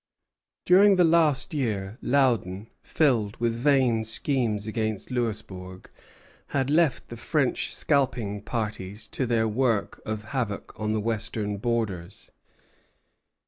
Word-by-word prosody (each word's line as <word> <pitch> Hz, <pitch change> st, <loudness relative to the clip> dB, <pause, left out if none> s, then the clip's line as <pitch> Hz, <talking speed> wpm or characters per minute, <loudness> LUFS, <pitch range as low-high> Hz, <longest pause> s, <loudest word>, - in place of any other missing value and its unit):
During 195 Hz, +2 st, +6 dB
the 180 Hz, -, +4 dB
last 160 Hz, -5 st, +3 dB
year 110 Hz, -7 st, -2 dB
Loudon, 115 Hz, -7 st, +1 dB
filled 120 Hz, -9 st, +1 dB
with 115 Hz, -1 st, 0 dB
vain 125 Hz, -2 st, +2 dB
schemes 110 Hz, -2 st, +1 dB
against 110 Hz, 0 st, -3 dB
Louisbourg, 100 Hz, -6 st, -4 dB, 0.6 s
had 135 Hz, 0 st, -1 dB
left 155 Hz, -3 st, +2 dB
the 120 Hz, -, -7 dB
French 145 Hz, +2 st, 0 dB
scalping 125 Hz, -8 st, 0 dB
parties 105 Hz, -2 st, -4 dB
to 130 Hz, -, -2 dB
their 115 Hz, -1 st, +2 dB
work 115 Hz, -1 st, 0 dB
of 110 Hz, -1 st, -4 dB
havoc 120 Hz, -7 st, -3 dB
on 105 Hz, 0 st, -2 dB
the 110 Hz, -, 0 dB
western 105 Hz, -1 st, -2 dB
borders. 100 Hz, -6 st, -3 dB
115 Hz, 115 wpm, -26 LUFS, 105-135 Hz, 0.6 s, During